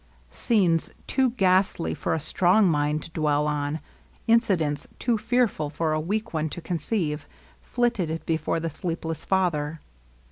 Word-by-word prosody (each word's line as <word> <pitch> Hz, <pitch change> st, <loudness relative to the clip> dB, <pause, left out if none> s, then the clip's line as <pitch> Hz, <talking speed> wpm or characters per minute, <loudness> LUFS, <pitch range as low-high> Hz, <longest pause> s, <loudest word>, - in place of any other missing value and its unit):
Scenes 180 Hz, -, +2 dB, 0.2 s
too 265 Hz, -2 st, +2 dB
ghastly 190 Hz, -6 st, +2 dB
for 165 Hz, -, -1 dB
a -, -, -1 dB
strong 185 Hz, +6 st, +3 dB
mind 150 Hz, -1 st, +1 dB
to -, -, -10 dB
dwell 150 Hz, -2 st, +1 dB
upon, 150 Hz, +1 st, -1 dB, 0.5 s
incidents 185 Hz, -, +2 dB
too 240 Hz, -1 st, +1 dB
fearful 225 Hz, -8 st, +1 dB
for 155 Hz, +1 st, -1 dB
a 155 Hz, -, 0 dB
weak 215 Hz, +6 st, -2 dB
one 160 Hz, 0 st, 0 dB
to 175 Hz, -, -6 dB
conceive^ 165 Hz, -2 st, -1 dB, 0.4 s
flitted 185 Hz, -10 st, -1 dB
before 165 Hz, 0 st, 0 dB
the 165 Hz, 0 st, -3 dB
sleepless 165 Hz, 0 st, -4 dB
father. 165 Hz, -5 st, 0 dB
165 Hz, 140 wpm, -25 LUFS, 155-200 Hz, 0.5 s, strong